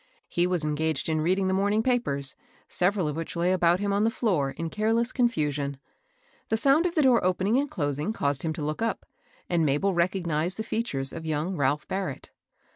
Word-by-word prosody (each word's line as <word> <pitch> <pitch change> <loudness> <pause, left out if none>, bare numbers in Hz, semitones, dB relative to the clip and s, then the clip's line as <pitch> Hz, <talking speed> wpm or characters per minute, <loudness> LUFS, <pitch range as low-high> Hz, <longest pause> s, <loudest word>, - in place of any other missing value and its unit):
He 175 +1 +1
was 180 -3 0
engaged 155 0 -1
in 155 -1 +1
reading 185 +4 +1
the 190 - +1
morning 205 +3 +2
papers, 180 - 0 0.3
several 185 -2 +1
of 150 - -2
which 165 +2 -5
lay 175 +2 +1
about 175 -1 +3
him 200 0 0
on 200 +1 +2
the 225 - +3
floor 185 - 0
in 165 +3 -5
careless 225 +3 +1
confusion. 150 - 0 0.7
The 220 - +2
sound 280 +8 +4
of 345 - -5
the 310 - +3
door 255 -3 +4
opening 190 +6 +2
and 285 +1 -1
closing 145 +4 -1
caused 140 -10 -1
him 160 - -1
to 155 - -5
look 155 +5 -3
up, 230 - -1 0.4
and 165 -4 +2
Isabel 170 +8 +1
recognized 175 -1 0
the 220 - -2
features 145 - -2
of 160 -1 -6
young 160 +4 -1
Ralph 145 0 0
Barrett. 190 0 -4
180 Hz, 200 wpm, -27 LUFS, 150-215 Hz, 0.7 s, sound